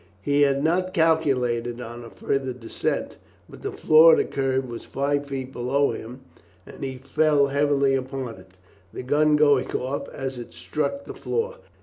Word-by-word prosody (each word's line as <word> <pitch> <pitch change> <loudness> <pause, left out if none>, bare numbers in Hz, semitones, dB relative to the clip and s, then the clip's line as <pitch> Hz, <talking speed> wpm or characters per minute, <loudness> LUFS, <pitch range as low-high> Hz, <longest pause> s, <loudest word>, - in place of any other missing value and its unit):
He 145 0 +2
had 140 -1 +3
not 185 +3 0
calculated 125 -8 +1
on 120 0 -8
a 115 - -10
further 135 +1 -2
descent, 120 -2 -3 0.3
but - - -13
the - - -3
floor 160 +1 +6
of - - +5
the - - +3
cave 135 -1 -1
was 120 -2 -7
five 145 +1 -1
feet 135 -1 -5
below 135 +4 +1
him, 125 +4 -8 0.4
and - - -11
he 130 -1 -4
fell 145 +2 +2
heavily 140 -1 +2
upon 130 -2 -3
it, 95 0 -17 0.4
the - - -7
gun 150 +3 +3
going 145 -3 +3
off 130 +3 -3
as 135 -2 -5
it 120 - -10
struck 280 - -3
the - - -7
floor. 485 +2 -3
135 Hz, 175 wpm, -24 LUFS, 125-150 Hz, 0.4 s, floor